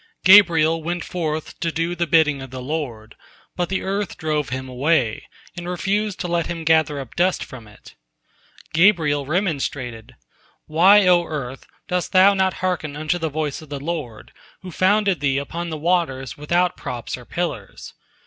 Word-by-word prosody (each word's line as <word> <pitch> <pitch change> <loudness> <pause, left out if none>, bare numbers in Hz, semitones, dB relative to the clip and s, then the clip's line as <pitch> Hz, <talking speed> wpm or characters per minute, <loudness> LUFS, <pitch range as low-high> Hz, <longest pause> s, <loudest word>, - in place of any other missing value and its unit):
Gabriel 165 -5 +6
went 175 +2 -3
forth 155 -3 -4
to 165 - -1
do 165 +2 -1
the 175 -1 -1
bidding 150 -3 +3
of 135 - -8
the 130 +1 -7
Lord, 125 -6 -5 0.4
but 175 -1 -2
the 190 - -2
earth 195 0 -3
drove 150 -2 -1
him 130 +1 -4
away, 130 -2 0 0.3
and 175 0 -6
refused 200 +3 -1
to 180 - -2
let 170 -1 0
him 170 -1 -5
gather 160 -2 +2
up 130 -4 -9
dust 180 +1 +1
from 120 -5 -11
it. 105 - -16 0.8
Gabriel 155 -5 +3
remonstrated: 140 - -3 0.5
"Why, 190 +6 +5
O 175 -1 +4
Earth, 135 -5 -6 0.2
dost 180 -2 -2
thou 190 +2 +7
not 190 -1 +1
hearken 160 -5 -2
unto 155 +4 -1
the 160 -1 -2
voice 150 -1 -3
of 155 - -14
the 145 -1 -5
Lord, 145 -7 -5 0.3
who 185 - -8
founded 195 0 +2
thee 135 -1 +1
upon 170 +5 -4
the 160 - -4
waters 155 -5 -1
without 175 +4 0
props 120 -1 -5
or 125 - -12
pillars?" 145 - -5
160 Hz, 170 wpm, -21 LUFS, 140-180 Hz, 0.8 s, thou